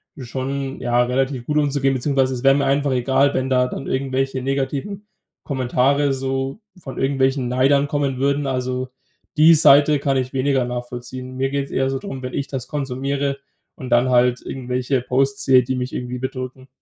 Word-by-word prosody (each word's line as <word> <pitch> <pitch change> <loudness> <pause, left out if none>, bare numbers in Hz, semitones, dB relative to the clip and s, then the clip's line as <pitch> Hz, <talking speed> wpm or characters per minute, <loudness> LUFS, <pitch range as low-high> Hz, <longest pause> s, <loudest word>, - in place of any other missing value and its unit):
schon, 135 +1 -4
ja, 120 0 +1
relativ 130 0 -1
gut 150 - 0
umzugehen, 140 -2 +1
beziehungsweise 130 0 +1
es 120 - -6
wäre 135 - +6
mir 140 - +1
einfach 140 0 +1
egal, 135 +2 +2
wenn 130 0 -1
da 125 -1 +3
dann 135 - -6
irgendwelche 135 0 -1
negativen 140 +10 -3 0.4
Kommentare 135 +1 +1
so 135 +4 -3 0.2
von 140 -7 -8
irgendwelchen 135 -1 +1
Neidern 135 +3 +2
kommen 140 -3 -1
würden. 140 +1 +1
Also 130 -1 -2 0.5
die 160 +2 +7
Seite 145 0 +6
kann 135 -1 0
ich 130 0 -2
weniger 135 -1 +1
nachvollziehen. 125 +1 -6
Mir 135 +1 0
geht's 140 0 -3
eher 135 0 0
so 135 - -1
drum, 135 0 -7
wenn 125 0 -6
ich 140 - -1
das 130 -3 -5
konsumiere 140 0 -2 0.4
und 130 - -8
dann 120 +1 +3
halt 125 0 +3
irgendwelche 125 0 -2
Posts 135 +2 0
sehe, 130 -1 +6
die 130 +2 -2
mich 125 0 -4
irgendwie 125 0 -4
bedrücken. 130 0 -6
135 Hz, 175 wpm, -21 LUFS, 130-140 Hz, 0.5 s, die